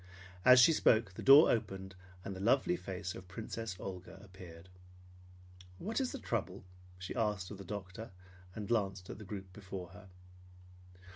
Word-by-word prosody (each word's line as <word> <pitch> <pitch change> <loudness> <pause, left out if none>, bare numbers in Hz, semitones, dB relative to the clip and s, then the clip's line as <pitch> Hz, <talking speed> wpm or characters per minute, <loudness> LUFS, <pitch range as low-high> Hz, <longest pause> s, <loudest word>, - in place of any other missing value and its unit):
As 125 +3 +8
she 165 +6 +7
spoke, 110 -9 +3
the - - -8
door 140 +4 +8
opened, 95 -4 -3 0.3
and 100 - -5
the - - -8
lovely 130 - +2
face 95 - -5
of 95 - -10
Princess 110 +1 -6
Olga 95 0 -8
appeared. 90 -3 -13 1.1
"What 225 - -2
is 260 - -1
the - - -5
trouble?" 95 -5 -3 0.3
she 95 0 -6
asked 105 -5 -1
of 100 - -8
the - - -7
doctor, 100 +3 -7 0.5
and 105 -2 -5
glanced 95 -5 -1
at - - -9
the - - -9
group 95 -2 -8
before 95 -3 -8
her. 100 +1 -14
100 Hz, 160 wpm, -34 LUFS, 95-115 Hz, 1.1 s, As